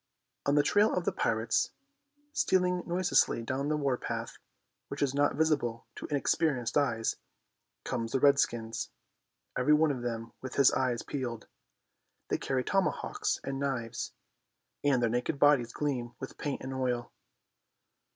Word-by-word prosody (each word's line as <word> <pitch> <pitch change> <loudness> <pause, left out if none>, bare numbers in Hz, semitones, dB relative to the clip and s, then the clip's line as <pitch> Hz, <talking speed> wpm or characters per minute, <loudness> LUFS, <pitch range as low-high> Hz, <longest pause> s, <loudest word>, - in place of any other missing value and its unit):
On 140 - +4
the 145 - +5
trail 205 +7 +4
of 180 - -1
the - - +2
pirates, 115 0 0 0.6
stealing 180 -1 +2
noiselessly 175 -9 +2
down 130 +4 -2
the 155 0 +1
war 140 -4 +1
path, - - -5 0.5
which - - -2
is 135 -2 +1
not 145 +1 +2
visible 140 -7 +1
to - - -6
inexperienced 140 -4 +1
eyes, 115 -6 +1 0.7
come 120 -3 -2
the 130 +4 0
redskins, 120 -5 +2 0.7
every 130 +4 +4
one 155 0 +4
of 130 -3 -4
them 115 -1 -4
with 130 -1 -6
his 140 -2 +6
eyes 125 -3 0
peeled. 120 -5 -4 0.8
They - - 0
carry 130 -1 -1
tomahawks 195 +4 0
and 135 0 -3
knives, 125 -5 -3 0.7
and 135 -4 +3
their - - +4
naked 125 +4 -1
bodies 140 -5 +4
gleam 125 -5 -2
with 130 - -8
paint 145 -2 -3
and 130 0 -4
oil. 125 -2 -1
135 Hz, 145 wpm, -30 LUFS, 120-145 Hz, 0.8 s, his